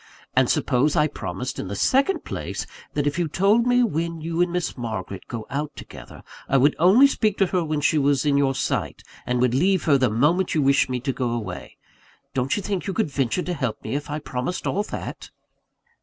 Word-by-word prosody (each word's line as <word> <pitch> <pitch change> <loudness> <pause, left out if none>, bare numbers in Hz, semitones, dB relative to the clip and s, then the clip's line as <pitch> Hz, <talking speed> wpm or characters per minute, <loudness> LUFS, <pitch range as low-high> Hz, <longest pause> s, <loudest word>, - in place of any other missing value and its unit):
And - - +4
suppose 135 +4 +2
I 150 - +4
promised, 135 -3 -5
in - - -4
the 100 - -4
second 275 - +2
place, - - -4 0.3
that, 145 -1 0
if 145 +4 -1
you 170 - +1
told 200 +9 +2
me 245 0 +4
when 170 -5 -2
you 165 +2 -2
and 175 0 +2
Miss 180 0 -2
Margaret 110 -6 -5
go 115 -2 -6
out 145 +1 -3
together, - - -11 0.3
I 135 - +4
would 145 +3 +4
only 195 - +7
speak 215 -7 +1
to 195 - +4
her 180 -1 0
while 155 -2 -2
she 150 +2 +3
was 140 0 +2
in 145 -1 +3
your 135 -1 +2
sight, - - -2 0.2
and 125 0 0
would 125 -1 +2
leave 185 +7 +2
her 140 -3 +4
the 130 -2 +3
moment 150 - +1
you 155 - +2
wished 140 -1 +3
me 125 -1 -1
to 135 +1 -2
go 125 -2 -2
away. 95 - -5 0.6
Don't 130 +5 0
you 205 - -3
think 195 -1 -3
you 195 - -2
could 180 -9 -1
venture 135 +6 0
to 180 - -3
help 130 -9 -3
me, - - -4
if 145 +1 -3
I 150 - -2
promised 145 +3 -4
all 200 - 0
that?" - - -7
145 Hz, 220 wpm, -23 LUFS, 130-180 Hz, 0.6 s, only